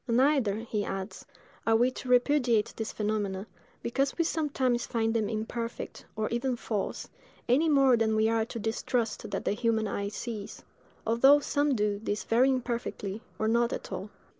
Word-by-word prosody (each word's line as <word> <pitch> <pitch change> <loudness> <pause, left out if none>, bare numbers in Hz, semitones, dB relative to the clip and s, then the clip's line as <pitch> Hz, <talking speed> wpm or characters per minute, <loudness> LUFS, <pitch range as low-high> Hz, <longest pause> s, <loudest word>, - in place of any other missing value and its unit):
Neither," 250 -3 +3
he 220 -3 -2
adds, 195 +1 -5 0.4
"are 225 - +5
we 245 +3 +4
to 255 - -8
repudiate 245 -3 +3
these 220 -1 -4
phenomena, 205 -2 -2 0.4
because 270 +3 0
we 335 - +3
sometimes 270 -7 0
find 225 -1 0
them 220 -3 0
imperfect, 230 +2 -4
or 215 0 -1
even 245 +2 0
false, 215 -4 -3 0.4
any 290 +7 +3
more 275 -4 +5
than 220 -1 +1
we 220 0 +3
are 225 0 +2
to 235 - -7
distrust 225 +1 -2
that - - -3
the - - +2
human 220 0 +1
eye 200 0 -2
sees, 215 -1 -6 0.4
although 265 +6 +6
some 290 -1 +1
do 210 -2 0
this 210 -1 -2
very 245 +4 +3
imperfectly, 235 -5 -2 0.2
or 220 - 0
not 235 +1 +2
at - - -5
all." - - -5
230 Hz, 165 wpm, -29 LUFS, 215-255 Hz, 0.4 s, although